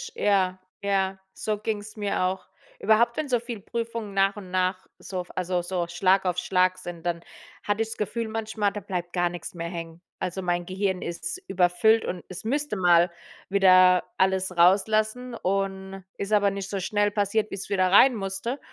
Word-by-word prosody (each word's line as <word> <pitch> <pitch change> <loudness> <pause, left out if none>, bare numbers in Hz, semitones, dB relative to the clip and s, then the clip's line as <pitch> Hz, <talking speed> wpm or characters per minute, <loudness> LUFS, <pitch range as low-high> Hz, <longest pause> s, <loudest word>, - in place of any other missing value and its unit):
,ja, 190 -2 +2 0.2
ja, 195 -1 0 0.2
so 215 -1 -2
ging's 215 0 -4
mir 205 -2 -1
auch. 185 +1 -1 0.3
Überhaupt, 230 +3 +3
wenn 310 -2 -2
so 245 -2 +2
viele 235 -3 -7
Prüfungen 230 -1 -4
nach 195 0 +2
und 195 -3 -10
nach 185 0 0
so 185 -2 -4
f 175 - -12
also 180 0 -1
so 175 -1 -2
Schlag 185 +3 +2
auf 180 -1 0
Schlag 185 0 +2
sind, 175 -2 -8
dann 170 -1 -1 0.4
hatte 205 +1 0
ich 225 - 0
das 225 - -6
Gefühl 225 +2 -2
manchmal, 220 -2 -1
da 210 - -5
bleibt 175 -2 -4
gar 175 -1 +1
nix 175 0 -7
mehr 170 -1 -5
hängen. 165 -1 -7 0.2
Also 185 +1 -3
mein 175 -1 -1
Gehirn 190 0 -1
ist 170 - -5
überfüllt 180 +5 +3
und 180 -1 -4
es 185 - -7
müsste 285 +2 -1
mal 175 -2 +4 0.4
wieder 185 -2 +6
alles 190 -1 +1
rauslassen 215 +7 +3
und 195 -1 -2
ist 200 +2 -3
aber 200 -1 +4
nicht 195 0 -5
so 195 - -2
schnell 205 +2 +1
passiert, 210 +1 0
wie's 195 0 -6
wieder 185 -2 +2
reinmusste 215 +2 +3
195 Hz, 180 wpm, -26 LUFS, 180-215 Hz, 0.4 s, wieder